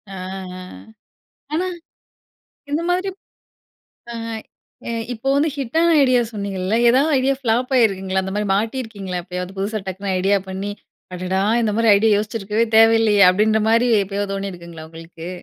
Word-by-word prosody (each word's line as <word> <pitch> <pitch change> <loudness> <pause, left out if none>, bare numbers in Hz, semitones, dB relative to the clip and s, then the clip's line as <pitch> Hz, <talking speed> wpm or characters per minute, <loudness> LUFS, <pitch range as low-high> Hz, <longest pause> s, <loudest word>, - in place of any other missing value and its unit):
ஆ. - - -7 0.4
அ. - - -8 0.9
ஆனா. 340 +4 0 1.1
இந்த 300 +3 0
மாதிரிப் 370 +2 -1 1.0
அ, - - -7 0.7
எ - - -3 0.2
இப்போ 245 +3 -4
வந்து 290 +3 +2
ஹிட்டான 320 +5 +1
ஐடியா 255 -2 +4
சொன்னீங்கல்ல, 200 -1 -3
ஏதாவது 275 +6 +3
ஐடியா 270 +1 +1
ஃப்ளாப் 245 +1 0
ஆயிருக்குங்களா? 190 -5 +1
அந்த 190 0 -5
மாதிரி 210 0 -1
மாட்டியிருக்கீங்களா, 210 -4 -3
எப்பயாவது? 180 +1 -6
புதுசா, 205 +3 -2
டக்குனு 190 +1 -4
ஐடியா 195 +2 +2
பண்ணி, 190 +2 -4 0.4
"அடடா, 185 +1 -2 0.2
இந்த 215 -2 0
மாரி 230 0 +2
ஐடியா 215 +2 +3
யோசிச்சிருக்கவே 215 +1 -1
தேவையில்லையே" 225 -2 +5
அப்படின்ற 215 +3 +2
மாரி 230 +2 +3
எப்பயாவது 200 +1 -3
தோனியிருக்குங்களா. 175 -5 -7
உங்களுக்கு? 165 +1 -10
210 Hz, 135 wpm, -20 LUFS, 190-235 Hz, 1.1 s, தேவையில்லையே